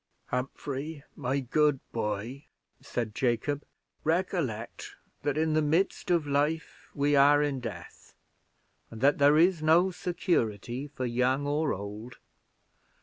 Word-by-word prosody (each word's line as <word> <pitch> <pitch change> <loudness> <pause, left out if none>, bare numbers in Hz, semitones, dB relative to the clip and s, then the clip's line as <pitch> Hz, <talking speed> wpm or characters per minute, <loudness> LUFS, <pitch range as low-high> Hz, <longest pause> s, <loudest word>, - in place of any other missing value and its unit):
"Humphrey, 140 +3 -4
my 135 +3 -1
good 145 +2 +2
boy," 115 +5 -3 0.4
said 115 -3 -3
Jacob, 130 +5 0 0.4
"recollect, 160 - -2 0.3
that 145 0 -1
in 160 0 +1
the 155 - +3
midst 165 +6 0
of 170 -4 +2
life 145 +3 -1
we 145 0 +2
are 145 +1 +6
in 140 -3 -1
death; 120 -2 -9 0.7
and 115 - -9
that 140 +2 +4
there 145 +2 +6
is 170 0 +4
no 170 +4 +4
security 135 - -1
for 135 -3 -5
young 125 +3 +1
or 145 +1 +1
old. 105 +5 -6
145 Hz, 125 wpm, -29 LUFS, 125-155 Hz, 0.7 s, are